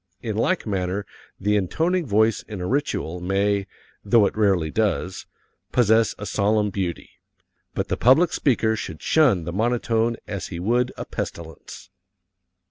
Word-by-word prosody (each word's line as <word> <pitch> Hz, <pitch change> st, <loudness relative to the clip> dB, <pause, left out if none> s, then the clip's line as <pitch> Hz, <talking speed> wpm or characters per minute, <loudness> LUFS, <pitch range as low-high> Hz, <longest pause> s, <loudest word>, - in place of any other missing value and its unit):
In 110 Hz, -3 st, -3 dB
like 165 Hz, -, 0 dB
manner 95 Hz, -1 st, -2 dB, 0.3 s
the 105 Hz, +2 st, +1 dB
intoning 165 Hz, -, 0 dB
voice 110 Hz, +1 st, +2 dB
in 105 Hz, -3 st, -6 dB
a 90 Hz, -, -3 dB
ritual 90 Hz, -, -1 dB
may 100 Hz, +2 st, 0 dB, 0.4 s
though 105 Hz, +1 st, +4 dB
it -, -, -1 dB
rarely 95 Hz, -7 st, +2 dB
does 100 Hz, -3 st, -1 dB, 0.4 s
possess 110 Hz, -2 st, +3 dB
a 100 Hz, -, -6 dB
solemn 105 Hz, 0 st, +1 dB
beauty. 95 Hz, -3 st, -4 dB, 0.6 s
But -, -, -2 dB
the -, -, -1 dB
public 135 Hz, +9 st, +4 dB
speaker 110 Hz, -5 st, +1 dB
should 80 Hz, -7 st, -7 dB
shun 130 Hz, -, +3 dB
the 85 Hz, +1 st, -5 dB
monotone 115 Hz, +1 st, 0 dB
as 100 Hz, -3 st, -5 dB
he 85 Hz, -, -6 dB
would 120 Hz, +7 st, +1 dB
a -, -, -5 dB
pestilence. 85 Hz, +2 st, -7 dB
105 Hz, 145 wpm, -23 LUFS, 95-115 Hz, 0.6 s, though